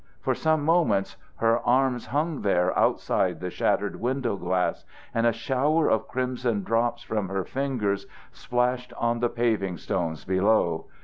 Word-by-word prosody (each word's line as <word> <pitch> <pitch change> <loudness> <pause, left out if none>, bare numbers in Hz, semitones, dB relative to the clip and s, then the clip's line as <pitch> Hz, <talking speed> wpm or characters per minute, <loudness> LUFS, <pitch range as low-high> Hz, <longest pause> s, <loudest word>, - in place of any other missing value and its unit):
For - - 0
some 155 -2 +1
moments 150 - +2 0.2
her 115 +1 +2
arms 125 0 +1
hung 150 +4 -1
there 90 -3 +2
outside 90 -2 +1
the 90 0 -4
shattered - - 0
window 125 -2 -1
glass, 90 -1 -1 0.3
and 115 0 +2
a - - +4
shower 135 +7 +1
of 110 - +1
crimson 125 -4 -1
drops 115 +3 0
from 105 -4 -2
her 95 -1 -1
fingers 125 -8 -2 0.2
splashed 125 0 -1
on 120 0 0
the 120 0 +1
paving 110 -7 0
stones 80 -4 -3
below. 95 -3 +2
115 Hz, 145 wpm, -26 LUFS, 100-130 Hz, 0.3 s, a